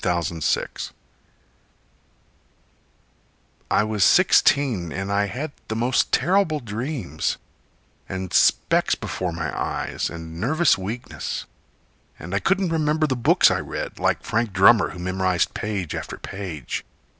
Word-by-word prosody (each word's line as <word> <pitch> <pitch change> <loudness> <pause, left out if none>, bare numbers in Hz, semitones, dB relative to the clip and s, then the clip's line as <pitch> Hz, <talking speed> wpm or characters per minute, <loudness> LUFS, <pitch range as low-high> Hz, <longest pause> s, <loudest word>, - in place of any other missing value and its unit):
Zenas 85 -3 +1
Witt - - -6 2.8
I - - +3
was 105 -2 0
sixteen, 110 - +4
and 95 +3 -3
I 100 0 +2
had 140 +9 -4 0.2
the 110 - -3
most 120 +3 +1
terrible 180 -4 +2
dreams, 115 - -3 0.7
And 95 -1 -5
specks - - +3
before 90 -2 -4
my 85 0 -4
eyes, - - -2
and 80 0 -8
nervous 155 +7 +3
weakness. 105 +6 -5 0.7
And 85 +4 -8
I 100 - +2
couldn't 195 - +1
remember 155 0 +1
the 135 -4 0
books 120 - +4
I - - +1
read, - - -5
Like - - +1
Frank 115 -2 -1
Drummer 95 +3 +6
who - - -9
memorized 95 0 0
page 100 -6 -3
after - - -5
page. 90 -9 -5
100 Hz, 125 wpm, -23 LUFS, 90-130 Hz, 2.8 s, Drummer